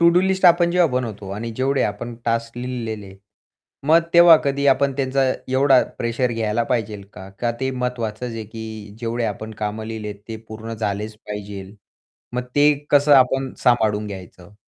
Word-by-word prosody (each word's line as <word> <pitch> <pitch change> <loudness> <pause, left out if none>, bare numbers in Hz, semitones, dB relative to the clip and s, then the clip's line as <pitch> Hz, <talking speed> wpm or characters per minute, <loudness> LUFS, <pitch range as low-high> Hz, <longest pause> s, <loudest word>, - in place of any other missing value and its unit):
To-do list 185 +3 +3
आपण 175 0 +6
जेव्हा 180 0 +4
आपण 125 - -8
बनवतो 105 -5 -6
आणि 115 +2 -4
जेवढे 135 +1 +1
आपण 115 +4 -3
टास्क 115 0 -1
लिहिलेले. 110 -6 -5 0.7
मग 160 +2 +6
तेव्हा 170 -1 +9
कधी 140 0 0
आपण 140 0 +3
त्यांचा 135 0 +1 0.3
एवढा 130 0 +4 0.2
प्रेशर 120 +1 0
घ्यायला 115 0 0
पाहिजे 110 -4 -2
का? 95 +1 -10
का 115 +5 -2
ते 130 0 0
महत्वाचंच 125 -2 -3
आहे 115 -1 -5
की 110 -1 -9
जेवढे 115 0 -2
आपण 110 +1 -4
काम 105 +1 -2
लिहिलेत 110 -2 -5
ते 110 - -5
पूर्ण 110 +1 -7
झालेच 105 0 -3
पाहिजे 100 -1 -8 0.6
मग 125 - -1
ते 145 +1 +6 0.2
कसं 145 0 +5
आपण 135 0 +3
सांभाळून 110 -4 +2
घ्यायचं? 95 -1 -10
115 Hz, 160 wpm, -21 LUFS, 105-135 Hz, 0.7 s, तेव्हा